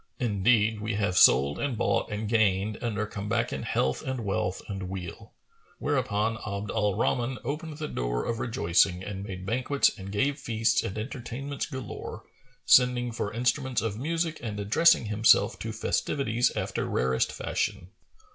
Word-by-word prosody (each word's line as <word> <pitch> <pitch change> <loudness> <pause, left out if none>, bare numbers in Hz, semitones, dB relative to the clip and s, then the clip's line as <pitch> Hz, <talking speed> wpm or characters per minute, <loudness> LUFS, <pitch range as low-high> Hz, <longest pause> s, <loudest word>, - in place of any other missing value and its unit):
Indeed 110 -1 +2
we 105 -1 -2
have 100 -3 0
sold 70 -4 +5
and 140 -5 -2
bought - - 0
and 105 +1 -3
gained 105 -2 +2
and 115 -3 -3
are 110 - 0
come 105 -1 -6
back - - 0
in - - -3
health, 65 0 0
wealth 105 -8 -2
and 95 -3 -5
weal." 90 -2 -7 0.5
Whereupon 110 +2 0
Abd 100 -1 -5
al 105 -3 +1
Rahman 125 +2 0
opened 150 +4 -4
the 155 -1 -4
door[FN#438] - - -2
of 115 - -5
rejoicing 90 -6 +2
and 100 0 -5
made 95 -2 -7
banquets 130 +6 +2
and 95 0 -8
gave 135 +8 0
feasts 115 -1 +1
and 100 - -5
entertainments 130 +4 -5
galore, 130 -3 -7 0.4
sending 125 -1 +5
for 105 -2 -3
instruments 125 +2 0
of 110 -1 -3
music 165 +3 -1
and 105 -3 -5
addressing 115 +8 +4
himself 105 +1 +4
to - - -4
festivities 125 -3 0
after - - -2
rarest 65 0 +1
fashion. 90 +2 -3
110 Hz, 155 wpm, -28 LUFS, 100-125 Hz, 0.5 s, sold